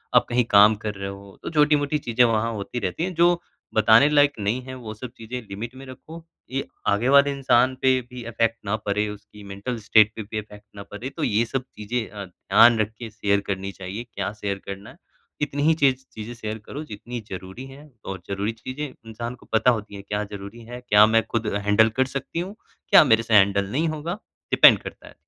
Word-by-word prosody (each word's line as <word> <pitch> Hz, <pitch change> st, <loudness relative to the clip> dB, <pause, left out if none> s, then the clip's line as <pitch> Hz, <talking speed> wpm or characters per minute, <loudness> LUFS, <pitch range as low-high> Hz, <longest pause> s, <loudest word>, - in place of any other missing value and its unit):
आप -, -, +6 dB
कहीं 125 Hz, 0 st, +2 dB
काम 105 Hz, +2 st, +7 dB
कर 105 Hz, -1 st, -3 dB
रहे 95 Hz, 0 st, -5 dB
हो, 100 Hz, 0 st, -11 dB
तो -, -, -4 dB
छोटी-मोटी 150 Hz, -1 st, +2 dB
चीज़ें 120 Hz, -3 st, +2 dB
वहाँ 115 Hz, 0 st, +1 dB
होती 105 Hz, +3 st, -5 dB
रहती 95 Hz, -, -2 dB
हैं 185 Hz, +1 st, -2 dB
जो 170 Hz, +1 st, +4 dB, 0.4 s
बताने 110 Hz, +5 st, +6 dB
लायक 145 Hz, -1 st, +4 dB
नहीं 105 Hz, +5 st, -1 dB
हैं, 130 Hz, 0 st, -8 dB
वो 115 Hz, -4 st, -8 dB
सब 120 Hz, +3 st, -9 dB
चीज़ें 120 Hz, +3 st, -6 dB
लिमिट 115 Hz, +6 st, -6 dB
में -, -, -10 dB
रखो। 160 Hz, +5 st, -11 dB, 0.3 s
ये 135 Hz, +1 st, -2 dB, 0.3 s
आगे 115 Hz, +5 st, 0 dB
वाले 140 Hz, 0 st, +6 dB
इंसान 130 Hz, -2 st, +2 dB
पे 130 Hz, -1 st, +4 dB
भी 125 Hz, -1 st, -8 dB
इफ़ेक्ट 115 Hz, 0 st, 0 dB
ना 105 Hz, +2 st, 0 dB
पड़े, 105 Hz, 0 st, -1 dB
उसकी 105 Hz, 0 st, -12 dB
मेंटल 100 Hz, +5 st, -4 dB
स्टेट 110 Hz, 0 st, +4 dB
पे 110 Hz, -, -5 dB
भी 110 Hz, +2 st, -6 dB
इफ़ेक्ट 105 Hz, -1 st, -12 dB
ना 100 Hz, -, -8 dB
पड़े, 115 Hz, +6 st, -6 dB
तो 155 Hz, +3 st, -6 dB
ये 115 Hz, -1 st, +2 dB
सब 130 Hz, +2 st, -3 dB
चीज़ें 110 Hz, +2 st, -3 dB
अ, 100 Hz, -1 st, -7 dB
ध्यान 115 Hz, +5 st, +4 dB
रख 110 Hz, 0 st, 0 dB
के 115 Hz, -2 st, -6 dB
शेयर 100 Hz, -2 st, 0 dB
करनी 100 Hz, 0 st, -3 dB
चाहिए, 95 Hz, +4 st, -7 dB
क्या 100 Hz, 0 st, -2 dB
शेयर 100 Hz, -1 st, -2 dB
करना 100 Hz, +1 st, -8 dB
है, -, -, -16 dB, 0.4 s
इतनी 145 Hz, -1 st, -1 dB
ही 160 Hz, +2 st, +5 dB
चीज़ 130 Hz, -1 st, +3 dB
चीज़ें 110 Hz, +2 st, -7 dB
शेयर 110 Hz, -2 st, -5 dB
करो 150 Hz, -, -6 dB
जितनी 120 Hz, 0 st, -7 dB
ज़रूरी 95 Hz, +7 st, -7 dB
हैं 140 Hz, +2 st, -14 dB
और 95 Hz, -2 st, -6 dB
ज़रूरी 100 Hz, +2 st, -1 dB
चीज़ें 130 Hz, +6 st, -6 dB
इंसान 115 Hz, 0 st, -8 dB
को -, -, -20 dB
पता 110 Hz, +3 st, +4 dB
होती 105 Hz, -3 st, -4 dB
हैं 100 Hz, -, -9 dB
क्या 105 Hz, 0 st, -1 dB
ज़रूरी 100 Hz, +3 st, -8 dB
है? 120 Hz, +2 st, -8 dB
क्या 105 Hz, +1 st, +7 dB
मैं 115 Hz, 0 st, +3 dB
खुद 115 Hz, -2 st, -2 dB
हैंडल 105 Hz, +2 st, +3 dB
कर -, -, +4 dB
सकती 165 Hz, -, -5 dB
हूँ? 190 Hz, +4 st, -5 dB, 0.3 s
क्या -, -, +8 dB
मेरे 115 Hz, -5 st, +3 dB
से 115 Hz, -, -3 dB
हैंडल 100 Hz, -1 st, +4 dB
नहीं 155 Hz, +6 st, 0 dB
होगा, 160 Hz, +5 st, -4 dB, 0.3 s
डिपेंड -, -, +8 dB
करता -, -, -10 dB
है। -, -, -13 dB
115 Hz, 220 wpm, -24 LUFS, 105-130 Hz, 0.4 s, क्या